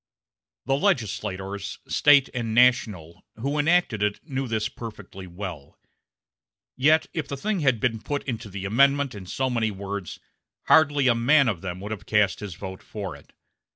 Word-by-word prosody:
The 135 - +1
legislators, 100 - -2
State 140 -2 +5
and 115 -3 -3
national, 105 -9 +2
who 140 +6 -2
enacted 160 - +2
it 105 0 0
knew 135 -2 -3
this 110 -2 -1
perfectly 105 -4 -9
well; 85 -5 -8 1.0
yet 155 +5 +4
if 160 - -3
the 140 - -5
thing 205 +6 -1
had 130 -7 +2
been 115 -1 -1
put 145 +3 -3
into 115 -5 -5
the 95 0 -6
Amendment 140 +6 +3
in 100 -3 -9
so 130 +7 -1
many 115 -3 0
words, 100 -2 -6 0.4
hardly 145 -3 +4
a 125 - +5
man 135 +4 +4
of 100 -7 -1
them 95 -1 -5
would 105 +2 -6
have 110 - -6
cast 105 -2 +2
his 100 -5 -7
vote 95 +1 -8
for 100 -7 -6
it. 70 - -18
110 Hz, 165 wpm, -25 LUFS, 100-135 Hz, 1.0 s, State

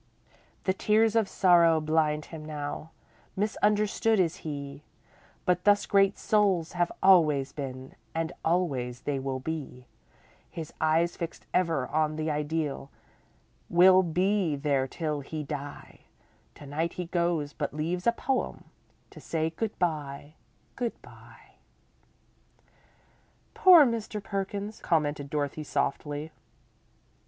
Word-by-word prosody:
The 190 - +1
tears 215 +3 +2
of 220 -4 +2
sorrow 170 -3 +5
blind 155 -1 +1
him 155 -1 -7
now, 150 0 -5 0.5
Misunderstood 210 +2 +1
is 175 0 +1
he, 140 -3 -6 0.6
But 180 0 +1
thus 205 0 +4
great 195 0 +3
souls 195 -6 +1
have 175 -1 0
always 155 -8 +5
been, 130 -2 -7 0.2
And 165 0 -1
always 135 -8 -1
they 140 -2 -2
will 130 0 -3
be; 135 -3 -6 0.6
His 160 -2 -7
eyes 160 +2 +2
fixed 170 -1 -6
ever 165 -7 +1
on 155 +1 0
the 155 0 -2
Ideal 150 -2 -2 0.8
Will 185 +2 +7
be 180 0 +1
there 140 -2 0
till 150 +1 -3
he 150 +2 -5
die, 145 0 -7 0.6
To 145 - -12
night 160 +4 -2
he 180 - -4
goes, 170 -4 -1
but 145 -2 -3
leaves 170 +6 -3
a - - +7
poem 260 +2 -2 0.5
To - - -12
say 160 -1 -1
good 220 +6 -4
bye, 150 -4 -3 0.4
good 240 -3 -3
bye! - - -17 2.0
"Poor 370 -9 +8
Mr. 230 -3 -2
Perkins," 200 +2 -4
commented 145 -4 0
Dorothy, 145 +1 -2
softly. 145 +1 -2
160 Hz, 120 wpm, -28 LUFS, 145-190 Hz, 2.0 s, Poor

